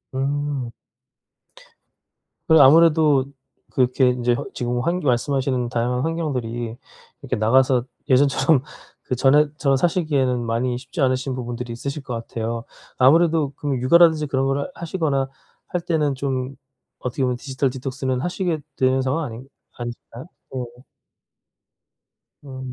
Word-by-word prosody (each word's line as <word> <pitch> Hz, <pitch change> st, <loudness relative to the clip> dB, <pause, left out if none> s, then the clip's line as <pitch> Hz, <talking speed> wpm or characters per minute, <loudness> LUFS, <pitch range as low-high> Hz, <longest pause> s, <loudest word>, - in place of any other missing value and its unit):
음. 140 Hz, -2 st, -2 dB, 1.8 s
그런 160 Hz, -2 st, +7 dB
아무래도 150 Hz, -1 st, +5 dB, 0.5 s
그렇게 125 Hz, 0 st, +3 dB
인제 125 Hz, -1 st, +1 dB
허 -, -, -4 dB
지금 120 Hz, 0 st, -2 dB
환겨 170 Hz, +4 st, -1 dB
말씀하시는 130 Hz, 0 st, 0 dB
다양한 120 Hz, +1 st, -1 dB
환경들이 125 Hz, -8 st, -3 dB, 0.5 s
이렇게 -, -, -2 dB
나가서 125 Hz, +3 st, +3 dB, 0.2 s
예전처럼 135 Hz, +1 st, +3 dB, 0.4 s
그전에처럼 140 Hz, +2 st, +2 dB
사시기에는 145 Hz, -6 st, +1 dB
많이 120 Hz, +2 st, -1 dB
쉽지 135 Hz, +6 st, -7 dB
않으신 130 Hz, 0 st, +1 dB
부분들이 120 Hz, -1 st, -5 dB
있으실 140 Hz, +5 st, -5 dB
것 130 Hz, -3 st, -5 dB
같아요. 115 Hz, 0 st, -4 dB, 0.3 s
아무래도 155 Hz, +2 st, +4 dB
그러면 140 Hz, -4 st, -2 dB
육아라든지 160 Hz, +3 st, +5 dB
그런 135 Hz, -1 st, 0 dB
거를 140 Hz, +4 st, -1 dB
하시거나 155 Hz, -6 st, -1 dB, 0.4 s
할 180 Hz, -, -2 dB
때는 155 Hz, -5 st, 0 dB
좀 130 Hz, 0 st, -3 dB, 0.4 s
어떻게 125 Hz, +1 st, -3 dB
보면 125 Hz, -1 st, +1 dB
디지털 135 Hz, +1 st, -2 dB
디톡스는 130 Hz, 0 st, -3 dB
하시게 175 Hz, 0 st, -2 dB, 0.2 s
되는 130 Hz, 0 st, +2 dB
상황 140 Hz, +5 st, -1 dB
아닌 125 Hz, 0 st, -8 dB, 0.3 s
아니실까요? 120 Hz, +2 st, -8 dB, 0.3 s
네. 125 Hz, -1 st, -7 dB, 1.6 s
음. 130 Hz, -2 st, -7 dB
130 Hz, 315 characters per minute, -22 LUFS, 125-145 Hz, 1.8 s, 그런